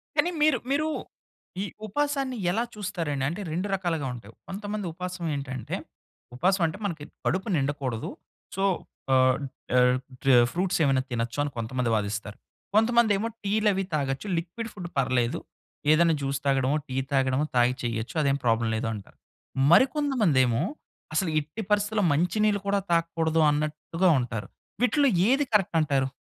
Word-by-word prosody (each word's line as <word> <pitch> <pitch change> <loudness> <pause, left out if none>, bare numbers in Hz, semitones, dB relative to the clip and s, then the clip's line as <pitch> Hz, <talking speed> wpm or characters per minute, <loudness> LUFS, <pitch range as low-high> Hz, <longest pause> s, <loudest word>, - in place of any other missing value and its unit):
కానీ 350 - +3
మీరు 300 -4 +5
మీరు 305 +2 +2 0.8
ఈ - - -2 0.2
ఉపాసాన్ని 275 +1 -1
ఎలా 225 +5 +1
చూస్తారండి? 165 -9 -3
అంటే 175 +5 -5
2 180 +5 -1
రకాలుగా 165 -7 -2
ఉంటాయి. 115 -2 -11
కొంతమంది 205 0 -4
ఉపాసమేంటంటే, 160 -8 -4 0.6
ఉపాసం 185 +6 +2
అంటే, 160 - -2
మనకి 160 -6 -3 0.2
కడుపు 190 +6 0
నిండకూడదు, 135 -5 -2 0.5
సో, 195 - -1 0.5
ఆహ్, 130 0 +5 0.4
ఆహ్, 125 0 +5 0.3
టే 135 -2 +6 0.2
ఫ్రూట్సేమైనా 160 -7 +2
తినొచ్చు 120 +3 -2
అని 145 - -3
కొంతమంది 120 +1 -1
వాదిస్తారు. 105 0 -3 0.4
కొంతమందేమో 225 -2 +4 0.2
టీలవి 205 -1 +2
తాగొచ్చు, 140 +5 -1
లిక్విడ్ 205 +7 -6
ఫుడ్ 180 -3 -7
పర్లేదు, 125 -2 +1 0.5
ఏదైనా 165 0 +4
జ్యూస్ 135 0 -1
తాగడమో, 135 +1 +2
టీ 130 - -4 0.2
తాగడమో, 135 +2 +2
తాగి 125 +1 +4
చేయొచ్చు. 115 +3 -3
అదేం 140 -1 +2
ప్రాబ్లమ్ 115 0 +2
లేదు 110 - -2
అంటారు. 100 -2 -10 0.5
మరి 260 - +8
కొంతమందేమో 170 - +2 0.5
అసలు 170 +1 +1
ఎట్టి 150 +8 -6
పరిస్థితిలో 210 +1 +2
మంచి 175 +8 +1
నీళ్ళు 205 -1 +3
కూడా 200 0 +2
తాగకూడదు 165 -1 +2
అన్నట్టుగా 155 +4 0
ఉంటారు. 115 -5 -4 0.3
వీటిల్లో 275 +2 +4 0.2
ఏది 275 +2 +3
కరెక్ట్ 190 -5 +2
అంటారు? 135 -3 +1
160 Hz, 135 wpm, -27 LUFS, 130-205 Hz, 0.8 s, మరి